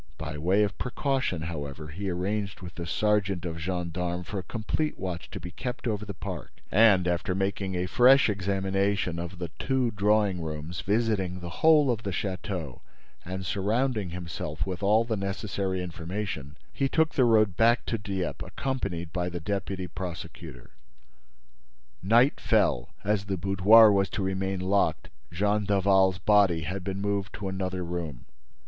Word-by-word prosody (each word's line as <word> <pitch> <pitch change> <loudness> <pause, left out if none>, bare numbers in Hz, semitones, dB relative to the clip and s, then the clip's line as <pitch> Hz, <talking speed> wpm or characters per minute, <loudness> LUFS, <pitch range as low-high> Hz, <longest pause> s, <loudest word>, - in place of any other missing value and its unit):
By 80 -1 -5
way 95 +7 +3
of 100 -2 -2
precaution, 130 - -1
however, 75 -2 -6
he 95 +6 -4
arranged, 95 +3 -2
with 90 -1 -8
the 85 -1 -6
sergeant 100 -2 +1
of 80 -1 -4
gendarmes, 90 0 -3
for 100 - -3
a - - -6
complete 120 +9 -2
watch 90 -3 -5
to - - -7
be 90 - -8
kept 125 +5 -5
over 105 -2 -2
the 100 - -5
park - - -6 0.2
and, 100 -4 +5
after 90 +1 0
making 95 0 -1
a 90 0 0
fresh 130 +8 +6
examination 95 -2 0
of 85 +2 -6
the 85 -2 -5
two 130 -3 +1
drawing 105 -3 +2
rooms, 80 +2 -5
visiting 100 -4 0
the 85 -1 -7
whole 155 -4 +6
of 115 -2 -2
the 100 - -4
château 95 - -4 0.4
and 95 +2 -5
surrounding 105 +3 0
himself 85 -3 -4
with 95 -1 -4
all 105 +3 +4
the 115 -1 -2
necessary 95 -1 -2
information, 85 -4 -5 0.2
he 135 -1 0
took 160 +2 +2
the 130 - +3
road 110 -5 +4
back 120 +3 +3
to 115 - -2
Dieppe, 95 -3 -3
accompanied 95 -11 -3
by 90 -1 -1
the 90 0 -5
deputy 95 +1 -3
prosecutor. 85 -5 -8 1.3
Night 120 +8 +4
fell. - - +2
As 100 -1 0
the 100 -1 -2
boudoir 100 +4 +6
was 100 -1 +2
to 100 - -3
remain 95 0 -1
locked, 100 +2 +1 0.2
Jean 105 +4 +1
Daval's 95 -2 +3
body 100 -5 +4
had 90 +4 -4
been 95 +1 -3
moved 100 0 -1
to 100 - -5
another 95 -1 -3
room. 85 -7 -5
95 Hz, 160 wpm, -27 LUFS, 90-105 Hz, 1.3 s, fresh